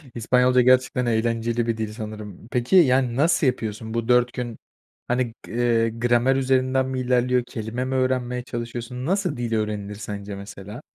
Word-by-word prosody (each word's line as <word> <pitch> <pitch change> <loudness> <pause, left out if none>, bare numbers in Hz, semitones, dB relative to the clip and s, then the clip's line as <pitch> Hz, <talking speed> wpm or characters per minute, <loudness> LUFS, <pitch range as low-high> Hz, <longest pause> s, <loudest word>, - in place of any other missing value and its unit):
İspanyolca 125 +2 +3
gerçekten 125 0 +3
eğlenceli 115 0 0
bir 115 -1 0
dil 110 -1 -3
sanırım. 105 -2 -8
Peki, 125 +6 +1
yani, 130 -8 +4
nasıl 155 +1 +3
yapıyorsun? 110 -2 -3
Bu 115 -1 -2
4 125 -1 +3
gün 120 -3 -5 0.5
hani 125 -2 0
g - - -11
eee, 115 -1 +2
gramer 120 +3 +2
üzerinden 130 0 +2
mi 130 0 -3
ilerliyor, 125 0 +2
kelime 115 +3 -4
mi 130 0 -2
öğrenmeye 125 -1 0
çalışıyorsun? 120 +1 -5
Nasıl 180 -5 0
dil 120 -2 -2
öğrenilir 105 -1 -3
sence 100 -1 -6
mesela? 100 +4 -9
120 Hz, 160 wpm, -23 LUFS, 115-130 Hz, 0.5 s, yani